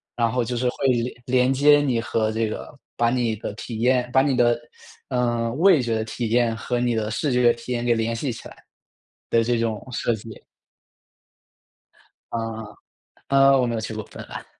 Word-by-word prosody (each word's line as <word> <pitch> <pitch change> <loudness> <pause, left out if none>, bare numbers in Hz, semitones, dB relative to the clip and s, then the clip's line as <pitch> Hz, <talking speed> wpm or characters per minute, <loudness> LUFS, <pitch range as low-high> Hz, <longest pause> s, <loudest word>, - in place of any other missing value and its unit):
然 115 -1 +1
后 125 +1 0
就 120 +2 -3
是 125 +1 +1
会 135 - -1
连 120 -1 0
连 130 +1 +2
接 145 +2 +5
你 130 -5 +1
和 110 -1 0
这 110 0 0
个， 145 - -8 0.2
把 120 0 +3
你 120 -2 0
的 105 - -5
体 110 +1 -7
验 125 +1 +2
把 130 - +6
你 135 -1 +1
的， 120 -1 +3 0.5
嗯， 120 -2 -1
味 175 -3 +5
觉 115 -2 -1
的 110 - -1
体 115 +1 -4
验 120 0 +2
和 120 +2 -2
你 120 0 +1
的 110 -1 -1
视 140 +6 -1
觉 125 -1 +5
体 120 +2 -9
验 120 -1 -1
给 120 - +3
联 115 +1 -1
系 130 +3 -2
起 115 - -9
来 - - -14 0.7
的 115 - +3
这 120 +1 +1
种 110 -2 -2
设 120 -1 0
计。 110 0 -11 1.9
嗯。 115 -1 -4 0.6
呃， 135 0 +5
我 125 - +2
没 120 -1 -2
有 110 - -2
去 110 - -5
过 110 - -4
芬 - - -10
兰。 - - -8
120 Hz, 215 characters per minute, -23 LUFS, 115-125 Hz, 1.9 s, 把